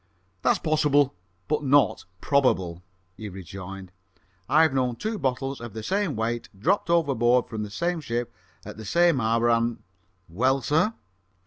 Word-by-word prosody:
"That's - - +3
possible, 145 -3 +2 0.3
but 150 0 0
not 140 0 +3 0.2
probable," 95 -12 +1 0.4
he 110 -1 -6
rejoined. 95 0 -9 0.6
"I've 155 -1 +4
known 125 -2 0
two 215 - -4
bottles 135 0 -2
of 120 -3 -8
the 110 - -6
same 195 - -1
weight 115 +2 -2
dropped 175 - +1
overboard 125 -7 +3
from 110 -2 -5
the 105 - -4
same 170 +10 -2
ship 120 -3 -3 0.3
at - - -9
the 110 - -8
same 170 - +3
hour, 115 +1 +2
and 115 0 0 0.2
" 95 +1 -43
"Well, 130 +10 +1
sir?" 160 - +1
125 Hz, 150 wpm, -25 LUFS, 110-150 Hz, 0.6 s, I've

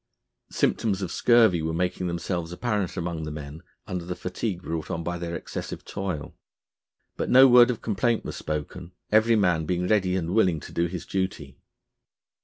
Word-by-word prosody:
Symptoms 100 -3 0
of 90 - -4
scurvy 115 -8 +4
were 80 +1 -2
making 90 +1 -1
themselves 85 0 -3
apparent 105 -1 -2
among 85 -2 -3
the 75 - -4
men 75 +1 -8 0.2
under 90 -1 -4
the 90 +1 -5
fatigue 90 +1 -4
brought 80 -2 -4
on 85 - -3
by 85 +1 -3
their 85 -1 -4
excessive - - -6
toil; 95 -6 -4 0.8
but - - -2
no 130 +1 +8
word 125 -1 +7
of 120 - -3
complaint 115 +2 0
was - - -5
spoken, 75 +3 -5 0.2
every 110 +2 +5
man 90 -7 +2
being 90 0 0
ready 95 -3 +2
and 85 -1 -2
willing 95 -7 +3
to - - -11
do 85 +1 +1
his 85 0 -6
duty. 85 -8 -3
90 Hz, 175 wpm, -26 LUFS, 85-100 Hz, 0.8 s, no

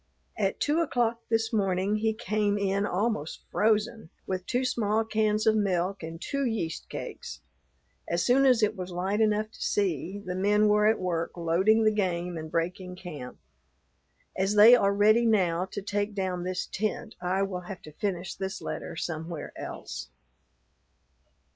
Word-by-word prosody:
At - - -1
two 295 +3 +1
o'clock 235 -6 0
this 225 0 +1
morning 195 0 +1
he 220 +1 +1
came 210 -2 0
in 200 0 0
almost 195 -5 -2
frozen, 220 -2 +1 0.2
with 185 -1 -4
two 255 +1 0
small 225 -3 +1
cans 215 -1 +1
of 220 - +4
milk 195 -2 0
and 165 0 -7
two 280 - -2
yeast 220 -10 -3
cakes. - - -7 0.7
As 170 +1 0
soon 270 +2 +5
as 245 -4 +4
it 210 - +2
was 185 -1 -6
light 190 +4 -1
enough 215 0 +1
to - - -15
see, 190 -1 -1
the 185 -3 -5
men 205 +3 +3
were 210 0 +4
at 220 - +4
work 170 -2 -2
loading 185 +7 +3
the 215 - +4
game 180 -4 -1
and 160 -1 -6
breaking 180 +3 -2
camp. 155 -9 -8 1.0
As 195 +2 0
they 215 +3 +9
are 200 -5 +3
ready 215 +4 +4
now 185 -5 +2
to 200 +1 -7
take 205 +1 -2
down 185 -2 -2
this 185 0 -2
tent, 215 +2 -3
I 185 +2 0
will 185 -2 -3
have 190 - -7
to 155 - -10
finish 180 +1 -3
this 190 +1 -4
letter - - -5
somewhere 160 -1 -5
else. - - -7
200 Hz, 165 wpm, -28 LUFS, 180-215 Hz, 1.0 s, they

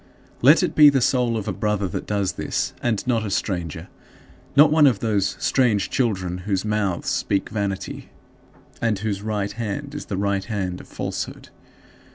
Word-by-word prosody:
Let 145 +7 +6
it - - 0
be 150 -1 +8
the 140 -1 +2
soul 125 -2 +1
of 105 - -5
a - - -1
brother 105 -2 -1
that - - -5
does 100 -2 0
this, - - -2
and 115 -4 -1
not 120 -3 +1
a 105 - -3
stranger 85 -4 -3 0.7
not 150 +1 +7
one 155 -2 +6
of 125 -6 +3
those 100 -3 0
"strange 120 -7 +1
children, 95 -8 -1
whose 95 +1 -2
mouth 105 -4 -1
speaks 100 0 -1
vanity, 100 -3 -4 0.7
and 115 -3 +1
whose 100 -1 -3
right 105 -1 -2
hand 120 +7 -5
is 150 - -6
the 100 - -3
right 100 -1 0
hand 95 -5 -3
of - - -16
falsehood." - - -5
105 Hz, 175 wpm, -23 LUFS, 95-120 Hz, 0.7 s, be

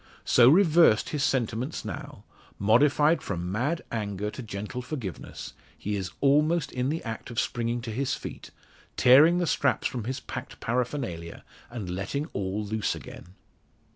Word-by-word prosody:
So 120 0 +6
reversed 165 - +5
his 150 -3 -1
sentiments 125 +2 -1
now - - -7 0.3
modified 145 +8 +4
from 90 -2 -4
mad 140 - -1
anger 105 -2 -3
to 130 - -7
gentle 110 +3 -5
forgiveness 125 - -6 0.2
he 105 0 -3
is 95 -3 -3
almost 150 +3 +3
in 125 +1 -1
the 160 +3 -2
act 115 +1 -6
of 120 - -2
springing 120 0 -1
to 115 -1 -5
his 130 +4 -1
feet, - - -8 0.5
tearing 150 +8 +7
the 175 - +1
straps 140 -3 +1
from 120 -4 -2
his 130 +2 -3
packed - - -8
paraphernalia, 120 - -3 0.3
and 115 -5 -6
letting 100 +11 -3
all 100 +2 -2
loose 110 +1 -1
again! 90 +3 -11
120 Hz, 150 wpm, -27 LUFS, 105-145 Hz, 0.5 s, tearing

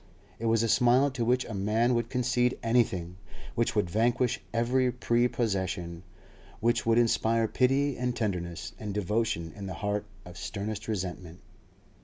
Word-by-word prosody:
It 115 - -2
was 115 0 +3
a - - +2
smile 125 +4 +4
to 130 -2 -2
which 125 +2 +2
a 110 - -7
man 110 +5 +1
would 120 0 0
concede 125 0 +1
anything, 95 -7 +1 0.4
which 115 -1 0
would 105 -4 +2
vanquish 115 +6 +1
every 125 +2 +2
prepossession, 100 -8 -1 0.6
which 115 0 +1
would 115 0 +4
inspire 115 -1 +2
pity 135 +4 +2
and 125 -1 -1
tenderness 90 -7 -3
and 105 -2 -5
devotion 105 -4 -1
in 100 -1 -6
the 95 - -5
heart 105 +2 -2 0.2
of 90 0 -10
sternest 105 +2 -4
resentment. 90 -4 -4
115 Hz, 150 wpm, -29 LUFS, 100-120 Hz, 0.6 s, smile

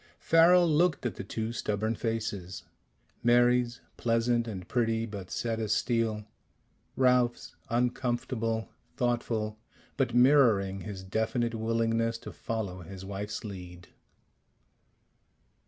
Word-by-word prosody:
Farrel 170 +2 +5
looked 160 -2 +2
at 120 - 0
the - - -7
two 110 +3 -4
stubborn 110 0 -1
faces: 105 -5 -3 0.6
Mary's, 120 0 +3 0.2
pleasant 115 0 +1
and 95 -5 -6
pretty, 115 -2 0
but 100 -4 -7
set 115 -1 -2
as 110 -2 0
steel; 115 -3 0 0.7
Ralph's, 125 -2 +2
uncomfortable, 120 -2 -1 0.3
thoughtful, 115 -3 -1 0.4
but 125 -4 0
mirroring 115 -8 +4
his 95 -1 -7
definite 110 +4 -1
willingness 115 0 0
to - - -9
follow 100 -5 -4
his 95 +2 -9
wife's 100 +2 -5
lead. 90 -4 -9
115 Hz, 105 wpm, -29 LUFS, 105-120 Hz, 0.7 s, Farrel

